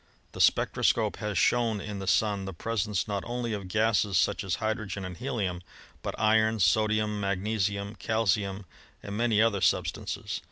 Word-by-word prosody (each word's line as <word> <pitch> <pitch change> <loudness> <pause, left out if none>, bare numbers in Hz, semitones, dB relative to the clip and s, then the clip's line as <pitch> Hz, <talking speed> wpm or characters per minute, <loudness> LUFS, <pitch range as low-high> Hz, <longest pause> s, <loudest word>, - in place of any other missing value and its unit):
The - - -4
spectro - - +3
scope - - +2
has 105 -3 -3
shown 115 +3 +2
in 100 0 -6
the 95 - -6
Sun 100 -1 +2
the 95 -2 -6
presence 105 0 -1
not 100 -2 -2
only 120 -1 -3
of 100 -3 -5
gases 105 -1 +2
such 100 +3 +1
as 95 -2 -1
hydrogen 110 -3 -3
and 90 -1 -6
helium, 100 -7 -3 0.4
but - - -5
iron, 110 +1 +3
sodium, 105 +3 +2
mag 100 -1 -1
nesium, 100 -1 -2
calcium, 105 -3 0 0.4
and 100 0 -6
many 110 -1 +3
other 105 -4 +1
substances. 90 - -1
105 Hz, 165 wpm, -28 LUFS, 95-110 Hz, 0.4 s, spectro